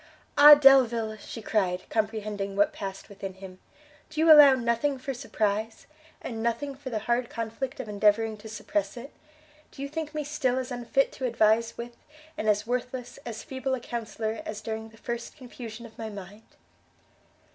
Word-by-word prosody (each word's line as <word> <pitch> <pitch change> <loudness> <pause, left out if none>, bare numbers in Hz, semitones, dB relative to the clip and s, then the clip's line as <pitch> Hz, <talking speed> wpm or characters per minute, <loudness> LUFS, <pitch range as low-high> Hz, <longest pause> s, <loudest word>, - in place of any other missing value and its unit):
"Ah 295 +1 +11
Delvile!" 245 -6 +5
she 220 +2 -9
cried, 185 -5 0
comprehending 210 -2 -2
what 205 +1 +3
passed 195 -1 -7
within 195 -2 -8
him, 190 -1 -11 0.5
"do 310 0 -6
you 320 0 +6
allow 290 -3 +9
nothing 245 +3 0
for 270 +1 -4
surprize? 220 -3 -2 0.4
and 225 -2 -5
nothing 235 +5 -1
for 270 0 -8
the 230 - -2
hard 240 0 0
conflict 230 +4 -5
of 260 - -5
endeavouring 210 +2 +2
to 220 +1 -11
suppress 295 +6 -3
it? 260 +5 -9 0.6
do - - -18
you - - -3
think 305 +1 -5
me 305 - -1
still 280 -4 -1
as 260 0 -3
unfit 245 +3 0
to 260 - -5
advise 230 0 +2
with, 235 0 -8 0.4
and 215 - -1
as 210 0 +2
worthless, 250 +1 -4
as 225 -2 -6
feeble 265 0 -2
a - - -6
counsellor, 225 -2 -4
as 215 -1 -6
during 220 0 -5
the 225 - -19
first 235 +4 -6
confusion 240 -3 -9
of 225 - -15
my 220 -1 -4
mind?" 205 +1 -11
230 Hz, 175 wpm, -27 LUFS, 215-260 Hz, 0.6 s, Ah